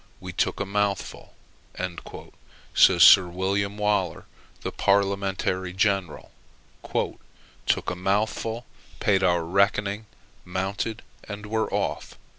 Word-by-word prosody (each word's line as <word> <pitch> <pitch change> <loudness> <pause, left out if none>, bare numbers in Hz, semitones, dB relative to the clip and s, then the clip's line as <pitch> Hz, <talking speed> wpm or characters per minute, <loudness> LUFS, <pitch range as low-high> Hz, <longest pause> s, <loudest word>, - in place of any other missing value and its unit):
"We 90 -1 -8
took - - 0
a 100 - -1
mouthful," 100 0 -2 1.4
says 90 -3 +6
Sir 90 +3 +9
William 100 +3 -1
Waller, 105 -5 0 0.4
the - - -4
Parliamentary 95 -2 0
general, 95 -3 -1 1.4
"took - - +1
a - - -4
mouthful; 110 +5 -1 0.3
paid 95 -2 +2
our 90 -2 +2
reckoning; 100 +4 +1 0.4
mounted; 95 +4 -3 0.2
and 105 0 -7
were 110 +1 -1
off." - - -3
100 Hz, 100 wpm, -25 LUFS, 95-105 Hz, 1.4 s, Sir